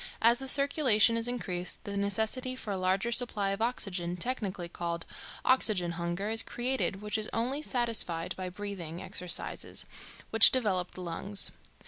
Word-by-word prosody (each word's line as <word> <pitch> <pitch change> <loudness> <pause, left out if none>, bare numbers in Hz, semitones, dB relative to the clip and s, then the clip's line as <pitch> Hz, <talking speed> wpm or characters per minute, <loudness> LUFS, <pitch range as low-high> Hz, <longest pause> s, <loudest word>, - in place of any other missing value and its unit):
As 235 +1 +4
the 270 - -4
circulation 260 -6 +5
is 230 +1 0
increased 185 -8 -3
the 200 - -6
necessity 220 +6 -1
for 225 -5 -6
a - - -1
larger 190 +5 0
supply 225 -5 +1
of 195 +2 -4
oxygen, 185 -7 -1
technically 195 -4 -3
called 170 -1 -4 0.4
"oxygen 210 -9 +3
hunger," 175 +5 -3
is 225 0 +6
created, 240 -5 -2
which 210 +1 -1
is 215 - -3
only 250 +6 -1
satisfied 230 - 0
by 185 -1 -5
breathing 180 -4 -7
exercises, 180 -2 -2 0.5
which 225 0 +9
develop 195 -8 0
the 185 - -7
lungs. 195 +4 +1
205 Hz, 150 wpm, -30 LUFS, 180-240 Hz, 0.5 s, which